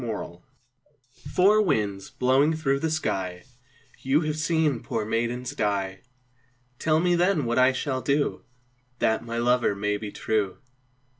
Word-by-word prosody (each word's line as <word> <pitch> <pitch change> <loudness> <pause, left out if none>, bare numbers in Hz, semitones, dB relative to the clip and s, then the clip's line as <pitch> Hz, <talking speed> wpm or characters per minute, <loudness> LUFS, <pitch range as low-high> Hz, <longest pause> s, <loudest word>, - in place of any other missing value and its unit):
Four 115 -3 -3
Winds 85 +1 -14 0.9
"Four 205 +4 +5
winds 105 - -1
blowing 135 +5 +2
through 140 -3 0
the 160 - -1
sky, 95 - -2 0.6
You 135 +4 +2
have 155 -2 -2
seen 155 -4 +1
poor 110 -2 -3
maidens 120 +3 -2
die, 100 -2 -2 0.8
Tell 155 0 +2
me 175 +1 +2
then 175 -4 +2
what 120 +2 +1
I 130 +1 +6
shall 130 0 -2
do 140 +3 0 0.5
That 110 -2 +1
my 115 0 -5
lover 120 -3 +2
may 105 +1 -1
be 105 0 -7
true." 105 -4 -1
125 Hz, 145 wpm, -26 LUFS, 105-155 Hz, 0.9 s, I